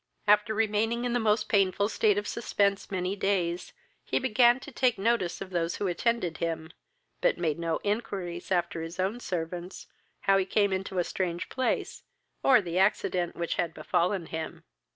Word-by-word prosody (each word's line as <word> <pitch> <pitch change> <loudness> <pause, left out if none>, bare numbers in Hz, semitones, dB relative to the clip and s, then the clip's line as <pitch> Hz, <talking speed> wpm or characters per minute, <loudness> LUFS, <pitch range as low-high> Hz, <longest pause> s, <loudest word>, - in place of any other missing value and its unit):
After 210 +1 +4
remaining 225 +2 +1
in 245 - 0
the 245 - +2
most 215 -1 +2
painful 200 -1 +2
state 210 -2 +2
of 205 - -2
suspense 200 -4 0
many 185 0 -1
days, 180 -3 -1 0.3
he - - -1
began 245 0 +4
to 290 - -9
take 250 -1 +2
notice 195 -3 0
of 190 -1 -6
those 170 -1 -1
who 205 - -3
attended 185 -1 0
him, 160 -1 -3 0.5
but - - +3
made 165 -3 -1
no 165 -1 -1
inquiries 195 -5 -3
after 170 -2 0
his 165 +2 -7
own 195 +6 0
servants, 175 -2 -5 0.4
how 195 0 +4
he 190 - +1
came 200 0 +2
into 190 0 -3
a 175 - +3
strange 175 -1 -3
place, 260 -1 -1 0.4
or 260 -4 +6
the 175 -1 -2
accident 185 -3 +1
which 170 -1 -2
had 170 -1 -1
befallen 180 -1 0
him. 160 0 -6
195 Hz, 175 wpm, -28 LUFS, 175-215 Hz, 0.5 s, or